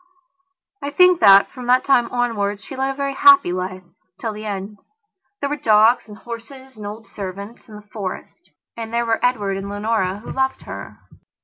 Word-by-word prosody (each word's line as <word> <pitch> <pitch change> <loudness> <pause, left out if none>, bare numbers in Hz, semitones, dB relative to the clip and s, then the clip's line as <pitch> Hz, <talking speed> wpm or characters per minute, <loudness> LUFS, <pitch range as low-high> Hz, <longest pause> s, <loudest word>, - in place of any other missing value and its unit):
I 285 - -3
think 360 +4 +5
that, 200 -1 +7
from 250 -2 -9
that 250 +1 +3
time 245 -4 +3
onwards, 215 -4 -1
she - - -9
led 265 +1 -1
a 270 - -3
very 275 0 -2
happy 370 - +6
life, 185 0 -4 0.4
till 225 -2 -3
the 215 +1 -7
end. 200 +1 -6 0.6
There 280 - -2
were - - 0
dogs 225 -2 +4
and 210 -1 -11
horses 255 +3 -10
and 210 -1 -8
old 220 +2 -8
servants 200 +4 -8
and 210 - -10
the - - -33
Forest. 200 -3 -7 0.3
And 225 -1 -6
there 235 0 0
were 225 -1 -1
Edward 205 -6 0
and 195 +1 -6
Leonora, 205 -2 -1
who 210 - -9
loved 265 0 -1
her. - - -9
225 Hz, 190 wpm, -20 LUFS, 205-255 Hz, 0.6 s, that